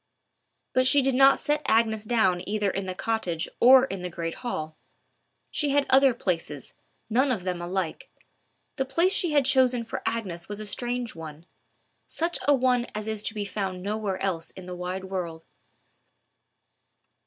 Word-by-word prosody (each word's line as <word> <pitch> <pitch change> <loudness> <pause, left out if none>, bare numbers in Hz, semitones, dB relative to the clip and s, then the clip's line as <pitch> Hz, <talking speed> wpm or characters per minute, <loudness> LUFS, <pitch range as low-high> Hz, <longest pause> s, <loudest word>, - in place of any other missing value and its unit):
But 255 0 +4
she 285 +1 +5
did 270 0 +2
not 270 +1 +6
set 295 0 0
Agnes 220 -1 +2
down 215 -6 +2
either 210 -2 0
in 195 0 -4
the 185 - -4
cottage 185 -7 -2
or 260 +1 +8
in 195 -7 -6
the 180 - -4
great 170 -1 -4
hall. 155 -10 -4 0.8
She 295 - 0
had 280 0 +2
other 265 -2 +6
places, 165 - -3 0.3
none 255 +5 +2
of 210 -8 -2
them 180 -1 -3
alike. 175 -1 -3 0.7
The 265 - 0
place 335 +8 +2
she 350 -6 +1
had 285 -3 +4
chosen 255 -3 +3
for 230 - -5
Agnes 190 -7 -3
was 205 0 -4
a 215 - -5
strange 240 +2 -2
one—such 165 - -7
a 290 - +7
one 250 -2 +1
as 215 0 -4
is 220 -1 -1
to 215 - -2
be 205 -1 -2
found 190 -2 -4
nowhere 205 -2 -2
else 170 -4 -1
in 190 - -11
the 180 - -7
wide 180 +1 -4
world. 175 -4 -5
215 Hz, 165 wpm, -26 LUFS, 180-255 Hz, 0.8 s, or